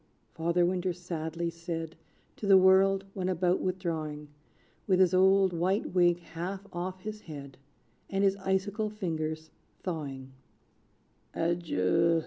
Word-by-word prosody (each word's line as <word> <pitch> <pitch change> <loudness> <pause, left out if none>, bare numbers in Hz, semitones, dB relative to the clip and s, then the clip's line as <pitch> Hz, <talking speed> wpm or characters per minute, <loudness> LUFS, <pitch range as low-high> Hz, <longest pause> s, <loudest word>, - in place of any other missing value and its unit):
Father 170 +2 +1
Winter 180 0 0
sadly 170 -1 -4
said 165 -1 -5 0.4
To 205 - -4
the 195 -1 +8
world, 190 +1 +5
when 185 -1 -2
about 180 0 +1
withdrawing, 160 -5 -3 0.6
With 185 -2 +3
his 185 -2 +5
old 190 0 +5
white 185 +5 0
wig 175 -1 +4
half 180 +4 -6
off 185 +1 -4
his 215 +1 -6
head, 140 -7 -10 0.5
And 195 0 0
his 195 -1 +4
icicle 195 +2 -1
fingers 160 -6 -4 0.3
thawing; 140 -7 -5 1.0
"Adieu! 165 - +2
175 Hz, 120 wpm, -30 LUFS, 165-190 Hz, 1.0 s, the